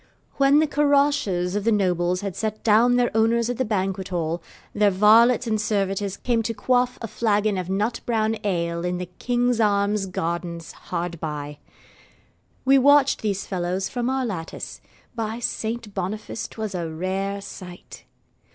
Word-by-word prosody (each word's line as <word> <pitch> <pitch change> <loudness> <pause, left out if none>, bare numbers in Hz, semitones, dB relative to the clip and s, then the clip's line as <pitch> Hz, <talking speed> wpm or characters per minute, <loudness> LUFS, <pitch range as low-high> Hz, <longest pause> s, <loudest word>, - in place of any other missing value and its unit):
When 275 +1 +5
the 310 - +5
caroches 285 -12 +1
of 205 - -1
the 230 - +2
nobles 180 -3 +1
had 200 -3 -4
set 215 -1 -3
down 230 +3 +4
their 245 -2 +1
owners 230 +1 +2
at 245 - -5
the - - +3
banquethall, 185 -5 -2 0.3
their 210 -1 +4
varlets 220 +5 +5
and 215 -2 0
servitors 200 -2 -1
came 235 -2 0
to 225 0 -3
quaff 250 +1 +1
a - - -2
flagon 210 -2 +1
of 185 -1 -4
nut 205 +5 -1
brown 220 -2 0
ale 170 -4 -1
in 180 0 -1
the 180 - -4
'King's 245 +6 -1
Arms' 200 -1 +1
gardens 170 -2 -4
hard 170 -1 -5
by. 150 -2 -5 1.1
We 270 +1 +6
watched 285 +1 +4
these 200 -3 -2
fellows 185 +1 -2
from 245 -1 -2
our 265 -1 0
lattice. 175 -8 -6 0.3
By 225 -1 -3
Saint 225 -2 -3
Boniface 210 +4 -4
'twas 215 -3 -5
a 170 -3 -3
rare 190 +4 -3
sight! 185 -2 -11
205 Hz, 155 wpm, -24 LUFS, 180-235 Hz, 1.1 s, We